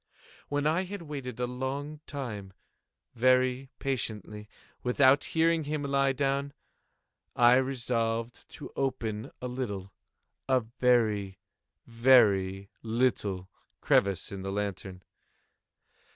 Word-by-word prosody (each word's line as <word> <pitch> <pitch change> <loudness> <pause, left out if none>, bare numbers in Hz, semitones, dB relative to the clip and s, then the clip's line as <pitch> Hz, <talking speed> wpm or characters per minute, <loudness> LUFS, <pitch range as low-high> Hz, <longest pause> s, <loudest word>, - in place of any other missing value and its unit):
When 145 0 -1
I 165 +5 +2
had 195 -1 -7
waited 135 -6 -6
a 125 - +1
long 135 +4 -4
time, 110 -9 -6 0.6
very 130 +2 +2
patiently, 105 -5 -4 0.3
without 130 +3 +4
hearing 165 -1 +1
him 150 0 -2
lie 140 -1 +2
down, 140 +1 -1 0.8
I 120 +1 +6
resolved 120 -3 -2
to 150 - -9
open 115 -5 -2
a - - -1
little—a 125 +2 -4 0.2
very, 110 -6 +2 0.5
very 105 -6 +3
little 110 -5 0 0.3
crevice 100 -2 +2
in 100 -1 -6
the 95 0 -4
lantern. 95 -2 -4
125 Hz, 100 wpm, -29 LUFS, 105-135 Hz, 0.8 s, I